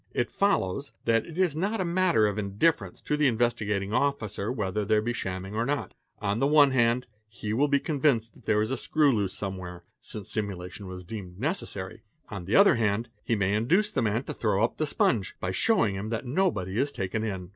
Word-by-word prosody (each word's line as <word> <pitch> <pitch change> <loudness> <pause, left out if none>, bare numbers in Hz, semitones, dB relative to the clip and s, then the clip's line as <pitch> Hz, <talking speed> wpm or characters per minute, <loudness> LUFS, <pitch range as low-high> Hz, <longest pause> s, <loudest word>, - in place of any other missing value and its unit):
It 120 - 0
follows 140 - 0
that 115 -1 +2
it 165 - -9
is 180 -5 +2
nota 195 +4 -1
matter 170 -9 +3
of 105 0 -1
indifference 105 +11 0
to 150 - -1
the 150 -1 +3
Investigating 105 -4 0
_ - - -4
Officer 110 -8 0
whether 105 -4 -1
there 105 +1 +3
be 120 +3 -1
shamming 95 -3 -4
or 110 +2 0
not; 135 -5 -2 0.2
on 105 +1 -1
the 135 - +3
one 145 -2 +6
hand, 120 -1 +2 0.2
he 110 -1 -5
will 140 +6 +3
be 140 0 +3
convinced 135 -7 +1
that - - -20
there 105 0 +3
is 110 - -3
a 135 - -1
screw 150 -5 +2
loose 100 -3 -1
somewhere, 90 -3 -6 0.2
since 105 -3 -6
simulation 95 -2 -4
has 90 0 -7
_been - - -23
deemed 95 -4 -7
necessary; 130 - -3 0.3
on 95 -5 -6
the 100 - 0
other 200 -10 +7
hand, 110 +1 0
he 115 - +1
may 100 -1 +1
induce 170 - +2
the 135 - 0
man 115 +2 0
to - - -5
throw 105 -2 +1
up 115 - 0
the 155 - 0
sponge, 110 -8 +1
by 95 - -2
showing 185 - +2
him 100 +3 -4
that 115 +2 -3
nobody 125 - 0
is 145 +2 +1
taken 100 -1 -3
in. 95 -5 -4
110 Hz, 215 wpm, -27 LUFS, 100-140 Hz, 0.3 s, other